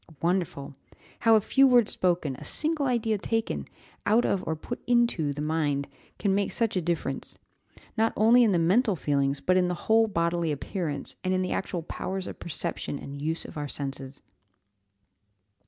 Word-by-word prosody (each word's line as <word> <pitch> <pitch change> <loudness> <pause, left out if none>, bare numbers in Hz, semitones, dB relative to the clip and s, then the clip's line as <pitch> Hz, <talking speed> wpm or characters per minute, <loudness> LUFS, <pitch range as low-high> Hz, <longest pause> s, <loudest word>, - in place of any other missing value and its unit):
Wonderful! 165 -5 -1 0.5
how 225 -1 +5
a 215 - +4
few 270 +6 +4
words 245 -4 +4
spoken, 170 -7 0
a - - -10
single 305 -2 +2
idea 225 -4 0
taken, 225 +2 -2 0.4
out 225 +3 +3
of 195 - 0
or 160 - 0
put 235 +10 -7
into 235 -11 +2
the 145 +1 -4
mind, 150 -3 0 0.3
can 200 -2 +1
make 200 +1 0
such 230 -3 0
a 185 - +1
difference, 170 0 -3 0.6
not 225 0 +2
only 235 +3 +6
in 220 - +4
the 180 - +2
mental 195 +6 +3
feelings, 140 -3 0
but 185 0 +2
in 180 -1 +3
the 180 - -1
whole 225 0 +4
bodily 170 -3 0
appearance, 150 +1 -4
and 185 0 +1
in 185 - +1
the 185 - -3
actual 175 -3 -2
powers 190 +3 -4
of - - -8
perception 155 -2 -4
and 140 0 -8
use 160 +3 -2
of - - -9
our 145 - -3
senses. 135 -1 -5
180 Hz, 175 wpm, -27 LUFS, 155-225 Hz, 0.6 s, only